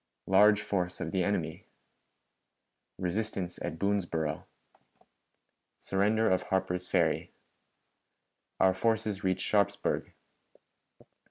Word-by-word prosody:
Large 105 +2 +5
Force 90 -4 -2
of - - -3
the 95 -2 +1
Enemy. 95 -4 -2 1.3
Resistance 95 -1 -3
at 80 - -4
Boonesboro. 85 -5 -1 1.3
Surrender 105 +3 +1
of 95 -2 +2
Harper's 90 -1 -1
Ferry. 85 -4 +1 1.3
Our 95 0 +5
Forces 110 0 0
reach 95 0 0
Sharpsburg. 100 0 0
95 Hz, 85 wpm, -30 LUFS, 90-105 Hz, 1.3 s, Large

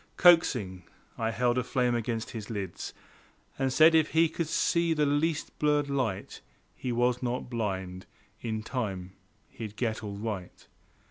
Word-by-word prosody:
Coaxing, 125 - +4 0.3
I 115 -1 -1
held 120 +2 +1
a - - -1
flame 125 -1 +1
against 115 -1 -2
his 110 -4 -7
lids 100 -5 -5 0.6
And 135 -1 +1
said 160 +4 +7
if 160 -1 +3
he 165 0 +5
could 165 0 -3
see 170 +1 +2
the 150 -1 +2
least 150 +2 0
blurred 145 -1 +2
light 115 -8 -2 0.3
He 125 - -3
was 120 +1 +1
not 125 0 -3
blind; 95 -5 -3 0.3
in 110 -2 -3
time 95 -7 -4 0.3
he'd 110 -2 -8
get 110 -2 -2
all 100 -1 -5
right. 105 -4 -5
120 Hz, 150 wpm, -29 LUFS, 105-145 Hz, 0.6 s, said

